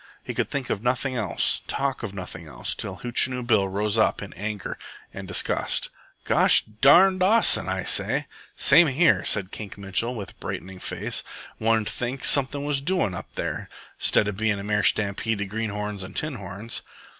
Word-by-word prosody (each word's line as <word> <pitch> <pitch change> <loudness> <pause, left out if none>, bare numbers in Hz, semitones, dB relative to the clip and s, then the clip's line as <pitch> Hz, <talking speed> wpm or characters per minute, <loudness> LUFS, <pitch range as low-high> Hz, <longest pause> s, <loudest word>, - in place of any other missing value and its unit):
He - - -5
could - - -1
think 140 -3 -3
of 100 - -2
nothing 130 +2 0
else, 115 -4 0
talk 135 -1 -2
of 110 -4 -4
nothing 90 -4 -8
else, 75 - -4
till 95 -2 -6
Hootchinoo 125 +1 +1
Bill 110 -5 +3
rose 105 +3 0
up 110 - +2
in 100 - -9
anger 105 0 -5 0.3
and - - -7
disgust. - - -1 0.3
"Gosh - - +6
darn 145 - +5
Dawson, 210 - +4
say - - -1
I!" 95 - -2
he - - +2 0.2
cried. - - -27 0.3
"Same 160 +5 +6
here," 145 +2 +3
said 100 -2 -1
Kink 105 -3 -8
Mitchell, 100 +5 -1
with 100 -4 -6
a - - -26
brightening 95 0 -6
face. - - -3 0.4
"One'd 110 -1 +1
think 125 +2 -4
something 140 +1 +1
was 145 -2 0
doin' 165 - +1
up 85 - -7
there, - - -4 0.3
'stead 105 - +3
of 105 -2 -3
bein' 110 -1 +1
a 100 - -6
mere 105 0 +1
stampede 105 +1 +1
of 100 - -3
greenhorns 105 -2 -3
an' 95 - -10
tinhorns." 110 - -4
110 Hz, 180 wpm, -25 LUFS, 100-130 Hz, 0.4 s, Gosh